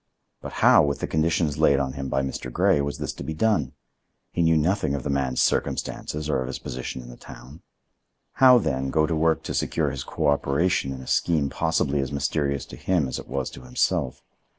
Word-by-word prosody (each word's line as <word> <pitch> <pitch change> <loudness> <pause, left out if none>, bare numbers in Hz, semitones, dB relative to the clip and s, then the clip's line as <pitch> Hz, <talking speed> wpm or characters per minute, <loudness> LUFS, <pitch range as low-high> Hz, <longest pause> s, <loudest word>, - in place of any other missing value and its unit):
But - - -8
how, - - +8
with 70 -1 -1
the - - -2
conditions 80 -1 0
laid 70 -1 +4
on 65 -1 -2
him 70 -1 -5
by 70 - 0
Mr. 65 -1 -5
Grey, 70 - +3
was 70 0 -3
this - - -4
to - - -8
be 80 - -5
done? 80 - +1 0.6
He 85 - -1
knew 80 -1 +4
nothing 80 -2 +1
of 70 - -4
the 70 - -2
man's 65 -2 +1
circumstances 75 0 -2
or 70 -4 0
of 65 - -4
his 65 - -4
position 65 0 -6
in - - -12
the - - -10
town. 65 +7 -13 0.8
How, 130 -1 +9
then, 65 - -1
go 75 +2 +2
to 80 - -1
work 80 0 +1
to - - -4
secure 75 -4 0
his 65 -1 -5
cooperation 70 0 0
in 65 -1 -6
a 65 - -11
scheme 75 -5 +1
possibly 80 -3 0
as 70 -1 -2
mysterious 70 0 -1
to - - -11
him 90 -7 0
as 65 - -4
it - - -10
was 65 -2 -3
to - - -11
himself? 65 0 -1
70 Hz, 215 wpm, -24 LUFS, 65-80 Hz, 0.8 s, How